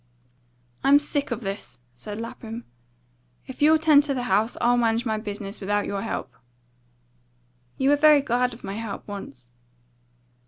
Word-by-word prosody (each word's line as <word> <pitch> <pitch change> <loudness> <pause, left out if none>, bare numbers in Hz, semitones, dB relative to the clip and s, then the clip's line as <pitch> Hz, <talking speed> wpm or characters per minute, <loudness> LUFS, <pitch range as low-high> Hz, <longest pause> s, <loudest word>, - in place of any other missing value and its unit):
"I'm 280 +1 +7
sick 290 0 -2
of - - -3
this," 195 - -5 0.2
said 205 - -8
Lapham. 230 0 -7 0.8
"If 260 - -10
you'll 310 +2 +6
'tend 310 -2 +6
to 280 -2 -1
the 250 - -2
house, 215 +2 +1
I'll 240 +1 +3
manage 230 0 +1
my 220 -2 -1
business 205 -1 -6
without 205 +1 0
your 200 -1 -3
help." 225 - -4 1.4
"You 270 +1 +3
were - - +6
very 300 -1 +6
glad 250 -1 0
of 230 - -17
my 195 - -5
help 225 -3 -6
once." 135 - -9
230 Hz, 155 wpm, -25 LUFS, 205-275 Hz, 1.4 s, I'm